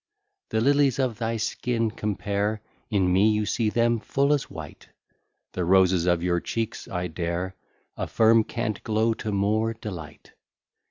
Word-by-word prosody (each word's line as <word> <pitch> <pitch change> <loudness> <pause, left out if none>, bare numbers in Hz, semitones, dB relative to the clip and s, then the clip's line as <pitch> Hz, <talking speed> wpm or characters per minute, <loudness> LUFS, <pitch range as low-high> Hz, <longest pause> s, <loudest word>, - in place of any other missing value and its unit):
The 110 - 0
lilies 140 0 +3
of 130 -5 -1
thy 115 0 -1
skin 115 0 -1
compare; 105 0 -2 0.3
In 95 -5 +2
me 100 +4 +5
you 105 0 +1
see 110 0 0
them 115 +1 +2
full 140 +7 +1
as 145 - -1
white: - - -10 0.6
The 90 - -2
roses 90 -1 +4
of 85 -1 +2
your 90 -1 +1
cheeks, 115 +5 -4
I 90 -1 -3
dare 85 +2 -3 0.4
Affirm, 115 0 +3
can't 110 -3 -3
glow 110 +1 +1
to 110 -1 -5
more 110 +3 +1
delight. 90 -9 -9
105 Hz, 150 wpm, -25 LUFS, 95-115 Hz, 0.6 s, me